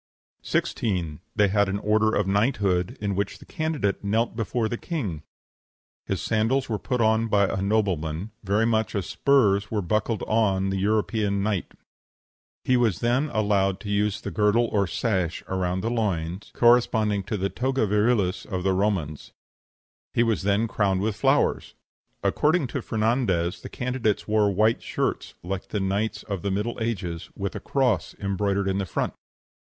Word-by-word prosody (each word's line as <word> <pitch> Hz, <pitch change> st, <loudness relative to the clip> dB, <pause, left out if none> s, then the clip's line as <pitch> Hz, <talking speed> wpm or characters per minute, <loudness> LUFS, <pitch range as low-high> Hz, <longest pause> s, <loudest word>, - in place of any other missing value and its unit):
16. 90 Hz, -9 st, -1 dB, 0.2 s
They 105 Hz, -1 st, +4 dB
had 100 Hz, 0 st, +2 dB
an 100 Hz, -, -1 dB
order 110 Hz, +1 st, +2 dB
of 105 Hz, -, +1 dB
knighthood, 100 Hz, -3 st, +1 dB
in 100 Hz, -1 st, -1 dB
which 100 Hz, 0 st, -2 dB
the -, -, -15 dB
candidate 155 Hz, -13 st, -2 dB
knelt 110 Hz, +4 st, 0 dB
before 115 Hz, 0 st, -1 dB
the 120 Hz, -, -2 dB
king; 115 Hz, -, -4 dB, 0.9 s
his -, -, -2 dB
sandals 115 Hz, +5 st, +1 dB
were 110 Hz, -3 st, -2 dB
put 125 Hz, -2 st, -2 dB
on 110 Hz, 0 st, +3 dB
by 100 Hz, -2 st, +3 dB
a 95 Hz, -, -2 dB
nobleman, 95 Hz, -3 st, 0 dB
very 105 Hz, +3 st, +2 dB
much 110 Hz, -1 st, 0 dB
as 100 Hz, -3 st, -1 dB
the -, -, -9 dB
spurs 100 Hz, -8 st, +3 dB
were 105 Hz, -3 st, -1 dB
buckled 110 Hz, +4 st, 0 dB
on 95 Hz, -4 st, +1 dB
the 95 Hz, -, -1 dB
European 105 Hz, 0 st, +1 dB
knight; 105 Hz, -3 st, -2 dB, 0.9 s
he 130 Hz, -, +3 dB
was 115 Hz, -7 st, +1 dB
then 125 Hz, +6 st, +1 dB
allowed 100 Hz, -4 st, +1 dB
to 105 Hz, -, -6 dB
use 105 Hz, 0 st, +1 dB
the -, -, -6 dB
girdle 110 Hz, +2 st, +3 dB
or 100 Hz, -2 st, +2 dB
sash 95 Hz, -6 st, -1 dB
around 95 Hz, -1 st, -1 dB
the 115 Hz, -, -1 dB
loins, 95 Hz, -5 st, -2 dB
corresponding 110 Hz, -4 st, +3 dB
to 105 Hz, +2 st, -3 dB
the 95 Hz, 0 st, -1 dB
toga 130 Hz, 0 st, 0 dB
virilis 105 Hz, -2 st, +1 dB
of 95 Hz, -3 st, -4 dB
the 95 Hz, 0 st, +2 dB
Romans; 95 Hz, -7 st, -1 dB, 0.8 s
he 120 Hz, -, +4 dB
was 115 Hz, -2 st, +1 dB
then 100 Hz, +3 st, +1 dB
crowned 100 Hz, -3 st, +1 dB
with 105 Hz, 0 st, -1 dB
flowers. 105 Hz, -, +1 dB, 0.5 s
According 155 Hz, +1 st, +2 dB
to -, -, -3 dB
Fernandez, 110 Hz, -6 st, 0 dB
the -, -, -8 dB
candidates 125 Hz, -4 st, -1 dB
wore 105 Hz, -1 st, +3 dB
white 110 Hz, +4 st, +2 dB
shirts, -, -, -2 dB
like 95 Hz, +1 st, -4 dB
the 105 Hz, -, -2 dB
knights 100 Hz, +3 st, -1 dB
of 100 Hz, -4 st, -4 dB
the 100 Hz, -, -2 dB
Middle 105 Hz, +6 st, -2 dB
Ages, 90 Hz, -8 st, -3 dB
with 100 Hz, -1 st, -3 dB
a -, -, -3 dB
cross 125 Hz, -, 0 dB
embroidered 100 Hz, 0 st, -1 dB
in 95 Hz, +1 st, 0 dB
front. 85 Hz, -, -2 dB
105 Hz, 165 wpm, -25 LUFS, 95-115 Hz, 0.9 s, They